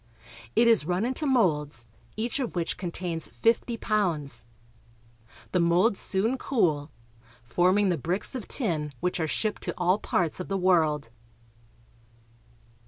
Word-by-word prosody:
It 235 - +5
is 230 -6 +5
run 180 +4 0
into 260 +5 -2
molds, 150 - +1 0.3
each 230 +5 -2
of 250 -7 -3
which 170 -2 -1
contains 170 -2 -4
fifty 230 +1 0
pounds. 170 - -1 1.1
The 180 - +2
molds 175 +5 +3
soon 225 +7 +1
cool, 155 - +1 0.5
forming 185 - +2
the 175 -4 0
bricks 180 - -1
of 255 -5 -5
tin 155 - -1
which 180 +4 -1
are 160 - 0
shipped 210 +6 -2
to - - -3
all 180 +3 +2
parts 175 -5 -1
of 180 - -5
the 195 - -1
world. 155 -8 +2
180 Hz, 135 wpm, -27 LUFS, 160-220 Hz, 1.1 s, It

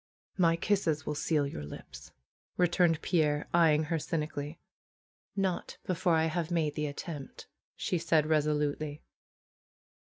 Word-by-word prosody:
^^My 165 -2 +4
kisses 165 -8 +1
will 150 - -1
seal 150 0 +1
your 105 - -5
lips," 75 - -10 0.5
returned 175 -2 +3
Pierre, 150 -4 +1
eye 165 -3 +6
ing 155 - +1
her 160 +1 -1
cynically. 150 -1 -3 0.8
^^Not 190 -3 -1
before 180 -1 +2
I 160 0 +3
have 160 0 -1
made 160 -4 +1
the 150 0 -1
attempt," 145 -1 -7 0.3
said 175 - -1 0.2
she, 150 - -6
res 155 -1 +3
olutely. 150 0 -1
155 Hz, 140 wpm, -31 LUFS, 150-170 Hz, 0.8 s, eye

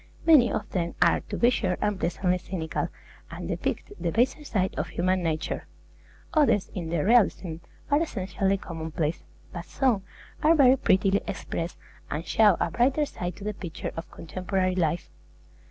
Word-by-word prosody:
Many 300 -7 +6
of 210 - -2
them 170 -2 -2
are, 170 - +4
to - - -3
be 240 +1 +4
sure, 185 -7 0
unpleasantly 185 -2 0
cynical, 170 -3 -3 0.4
and - - -7
depict - - -3
the 170 - -1
baser 255 - +1
side 190 -9 -1
of 155 - -2
human 185 +1 0
nature; 160 -2 -2 0.7
others, 285 - +3
in 170 -4 -4
their 165 -1 0
realism, 200 -7 +3 0.3
are 290 +2 +4
essentially 195 - -1
commonplace; 160 -2 -3 0.3
but 170 0 -6
some 255 -7 +1 0.4
are 320 +2 +5
very 265 -4 +6
prettily 195 -4 +2
expressed, 170 +1 -4 0.3
and 155 +3 -3
show 210 -5 +4
a - - 0
brighter 270 +5 +2
side 175 - -5
to 195 - -11
the 210 +1 -2
picture 175 -5 -6
of 165 - -6
contemporary 185 +2 -2
life. 170 -2 -1
185 Hz, 155 wpm, -27 LUFS, 170-235 Hz, 0.7 s, Many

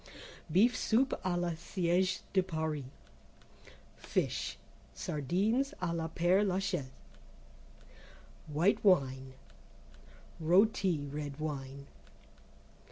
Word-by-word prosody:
Beef 220 +9 +4
Soup 245 +4 +2 0.2
à 180 -2 0
la 175 -1 0
Siège 180 +2 0
de 190 - +4
Paris. 160 -5 -3 1.1
Fish. - - -2 0.4
Sardines 200 - 0
à 180 -2 -1
la 165 -1 -2
père 175 +5 +2
Lachaise. 185 -7 -1 1.6
(White 170 +7 +2
Wine). 135 -9 +2 1.1
Rôti 180 -3 +3
(Red 145 -1 -5
Wine). 140 -2 -5
175 Hz, 85 wpm, -32 LUFS, 150-190 Hz, 1.6 s, Beef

